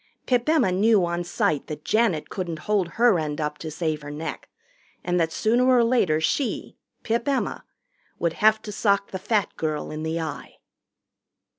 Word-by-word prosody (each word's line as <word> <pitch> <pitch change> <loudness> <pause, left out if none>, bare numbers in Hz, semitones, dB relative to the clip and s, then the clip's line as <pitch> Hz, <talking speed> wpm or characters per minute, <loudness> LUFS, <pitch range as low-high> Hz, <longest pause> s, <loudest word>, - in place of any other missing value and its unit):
Pip 245 +2 +1
Emma 310 - +3
knew 200 0 +4
on 175 0 -2
sight 155 -4 -1
that 150 -1 -7
Janet 215 -9 +1
couldn't 170 -5 -4
hold 205 -4 +1
her 230 -6 +4
end 150 -1 -3
up 150 0 -3
to 160 - -5
save 155 -1 -2
her 145 - -8
neck, 150 +2 -6 0.5
and 180 0 0
that 165 -1 +1
sooner 240 +7 +2
or 250 -2 +5
later 230 -10 +2
she, 240 - -1 0.3
Pip 235 +2 -1
Emma, 275 -2 -1 0.5
would 170 -1 0
have 215 +2 +3
to 210 - -6
sock 200 -1 +1
the 190 - -4
fat 210 0 0
girl 155 -2 -2
in 155 0 -5
the 160 +1 -2
eye. 155 -3 -6
180 Hz, 175 wpm, -24 LUFS, 160-225 Hz, 0.5 s, or